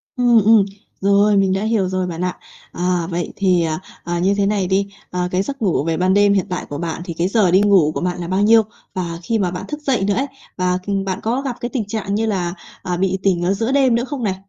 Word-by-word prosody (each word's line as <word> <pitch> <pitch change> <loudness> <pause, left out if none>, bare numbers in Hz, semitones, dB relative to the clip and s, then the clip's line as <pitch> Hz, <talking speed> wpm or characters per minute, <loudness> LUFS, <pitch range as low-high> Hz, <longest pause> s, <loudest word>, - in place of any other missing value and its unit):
Ừm, 240 -3 +4
ừm, 220 -3 +6 0.4
rồi, 200 +1 +4
mình 190 -1 +3
đã 195 +2 -1
hiểu 215 -4 +1
rồi 185 -1 -1
bạn 170 0 -5
ạ. 180 0 -2 0.3
À, 175 -1 -1
vậy 175 0 -3
thì, 185 -3 +2
à, 155 0 -2 0.2
à, 175 0 -2
như 195 +3 +2
thế 200 - +2
này 200 -3 0
đi, 195 +1 +1 0.2
ờ, 180 0 -1
cái 185 +1 +1
giấc 275 +4 -5
ngủ 180 -8 +1
về 165 -1 -1
ban 185 +1 +2
đêm 205 0 +4
hiện 195 -1 +1
tại 180 - -3
của 145 - -4
bạn 170 +1 -4
thì 170 - -5
cái 175 +2 +1
giờ 195 -4 +2
đi 190 +2 +5
ngủ 190 -7 +4
của - - -2
bạn 180 0 -2
là 170 - -4
bao 190 +2 0
nhiêu? 225 +2 +6 0.3
Và 170 -2 -4
khi 225 +2 0
mà 180 -3 0
bạn 180 +2 -5
thức 300 0 -6
dậy 260 -8 0
nữa 205 - +1
ấy, 270 +6 0 0.3
và, 180 0 +1
ừm, 195 -1 -1
bạn 190 -1 -2
có 240 +5 0
gặp 260 -4 -3
cái 240 0 -3
tình 240 -6 -2
trạng 205 -2 -3
như 225 +1 0
là, 180 -5 -1 0.3
ờ, 180 -1 -3
bị 190 0 0
tỉnh 180 -3 +2
ở 185 +3 +2
giữa 225 +5 -1
đêm 265 -4 +3
nữa 240 - 0
không 265 -2 -5
này? 190 -3 0
195 Hz, 275 wpm, -19 LUFS, 180-220 Hz, 0.4 s, ừm